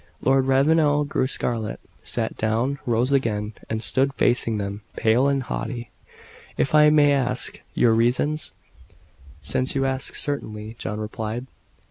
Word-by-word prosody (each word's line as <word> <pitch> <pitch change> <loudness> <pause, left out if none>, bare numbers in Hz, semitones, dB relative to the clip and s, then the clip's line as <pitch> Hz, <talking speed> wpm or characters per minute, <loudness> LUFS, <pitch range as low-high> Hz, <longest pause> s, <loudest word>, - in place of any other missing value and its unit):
Lord 135 0 +3
Ravenel 145 +2 +3
grew 130 -2 0
scarlet 115 -4 -2 0.2
sat - - -2
down 115 +6 0
rose 120 +3 +1
again, 110 -6 0 0.2
and 110 0 -2
stood 135 +1 +1
facing 115 -2 +2
them, 100 0 -4
pale 115 +5 +3
and 140 -1 +1
haughty. 120 -2 -5 0.7
"If 135 - 0
I 150 0 +7
may 150 -1 +5
ask 135 -2 -1
your 115 -2 +4
reasons?" 125 +7 +1 0.9
"Since 130 - -1
you 135 0 +1
ask 135 0 -2
certainly," 110 -6 -3
John 105 0 -4
replied. 110 +3 -4
130 Hz, 135 wpm, -23 LUFS, 110-140 Hz, 0.9 s, I